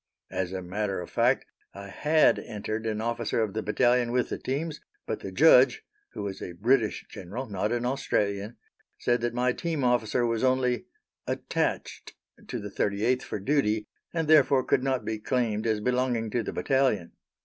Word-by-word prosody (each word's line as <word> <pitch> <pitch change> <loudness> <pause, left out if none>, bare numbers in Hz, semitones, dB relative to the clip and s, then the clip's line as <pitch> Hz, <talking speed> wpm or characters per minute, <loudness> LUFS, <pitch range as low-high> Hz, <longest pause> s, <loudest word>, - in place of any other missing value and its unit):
As 95 -1 -2
a 95 -1 -4
matter 100 +2 -2
of 90 - -8
fact, - - +2 0.3
I 100 0 -8
had 155 +9 +3
entered 110 0 -4
an 110 -1 -2
officer 115 0 -1
of 105 -3 -3
the 110 - -2
battalion 120 +2 +2
with 125 0 +1
the - - -4
teams, 150 +4 -3 0.2
but - - -3
the - - -7
judge - - +6 0.3
(who - - -5
was 100 -1 -5
a 90 - -6
British 110 +4 +1
General, 100 +9 -6
not 105 -1 -2
an 120 0 -1
Australian) 105 -4 -1 0.4
said 120 0 +1
that 120 0 -1
my 125 0 +2
team 160 -2 -2
officer 120 -1 +2
was 115 0 0
only 130 +5 +1 0.4
"attached" - - -2 0.3
to 125 - -4
the 105 -3 -6
38th 110 +7 +1
for - - -5
duty, 110 -2 +1 0.3
and 165 -2 -1
therefore 140 -4 +5
could - - +2
not 130 -1 -1
be 110 -1 -3
claimed 115 -2 0
as 110 -1 +1
belonging 125 -2 0
to 120 - 0
the - - -4
battalion. 130 -10 +1
120 Hz, 175 wpm, -27 LUFS, 105-130 Hz, 0.4 s, judge